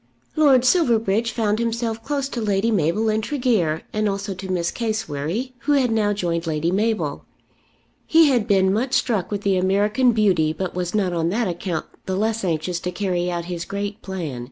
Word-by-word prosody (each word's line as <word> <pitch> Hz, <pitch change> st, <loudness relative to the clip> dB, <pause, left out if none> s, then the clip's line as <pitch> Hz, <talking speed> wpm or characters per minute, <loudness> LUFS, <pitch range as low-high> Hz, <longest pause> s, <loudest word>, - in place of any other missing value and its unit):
Lord 275 Hz, -5 st, +5 dB
Silverbridge 230 Hz, -, +2 dB
found 215 Hz, -2 st, 0 dB
himself 230 Hz, -1 st, -2 dB
close 280 Hz, 0 st, -1 dB
to 240 Hz, -, -4 dB
Lady 210 Hz, +1 st, +1 dB
Mabel 195 Hz, +3 st, +1 dB
and 215 Hz, 0 st, +1 dB
Tregear, 225 Hz, -, 0 dB
and 215 Hz, 0 st, +1 dB
also 200 Hz, 0 st, -3 dB
to 185 Hz, 0 st, -6 dB
Miss 170 Hz, -2 st, 0 dB
Cassewary, 215 Hz, -, -3 dB
who 290 Hz, +4 st, +1 dB
had 260 Hz, -4 st, +2 dB
now 215 Hz, -2 st, +2 dB
joined 170 Hz, -4 st, -2 dB
Lady 160 Hz, +1 st, 0 dB
Mabel. 215 Hz, +3 st, -1 dB, 0.8 s
He 325 Hz, 0 st, +6 dB
had 240 Hz, -5 st, +1 dB
been 190 Hz, -2 st, +3 dB
much 245 Hz, +5 st, -1 dB
struck 215 Hz, -8 st, 0 dB
with 205 Hz, -1 st, -3 dB
the 195 Hz, -2 st, +1 dB
American 205 Hz, +7 st, +2 dB
beauty, 185 Hz, -8 st, +2 dB
but 185 Hz, +1 st, -4 dB
was 180 Hz, +1 st, -3 dB
not 190 Hz, -4 st, +1 dB
on 165 Hz, -1 st, 0 dB
that 220 Hz, +4 st, 0 dB
account 175 Hz, -2 st, -3 dB, 0.2 s
the 190 Hz, -, -1 dB
less 220 Hz, +2 st, -1 dB
anxious 170 Hz, 0 st, -1 dB
to 180 Hz, -, -4 dB
carry 180 Hz, -2 st, -1 dB
out 170 Hz, -1 st, -3 dB
his 175 Hz, -1 st, -4 dB
great 205 Hz, +3 st, -5 dB
plan. 170 Hz, -10 st, -5 dB
205 Hz, 185 wpm, -22 LUFS, 180-230 Hz, 0.8 s, He